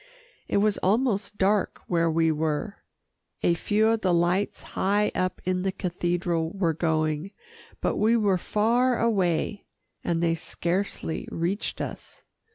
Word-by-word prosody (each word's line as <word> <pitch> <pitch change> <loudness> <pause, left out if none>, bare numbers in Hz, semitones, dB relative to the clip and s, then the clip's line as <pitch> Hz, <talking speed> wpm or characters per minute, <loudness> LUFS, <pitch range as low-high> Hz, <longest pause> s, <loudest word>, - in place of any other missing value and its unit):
It - - +1
was 205 0 +2
almost 205 -1 +1
dark 200 +1 +1
where 170 -1 +1
we 160 0 +2
were. 155 +6 -2 0.7
A 170 - +4
few 210 +5 +1
of 225 0 +2
the 185 - +2
lights 175 +4 +1
high 205 +2 +2
up 185 0 -1
in 185 0 0
the 190 +1 0
cathedral 175 -2 -1
were 175 -4 +1
going, 155 +1 0 0.5
but - - 0
we 225 +2 +3
were 200 -4 +2
far 235 +6 +2
away, 200 -3 0 0.4
and 170 0 0
they 165 -1 +3
scarcely 170 +1 -3
reached 175 +5 -2
us. - - -7
185 Hz, 140 wpm, -26 LUFS, 170-205 Hz, 0.7 s, A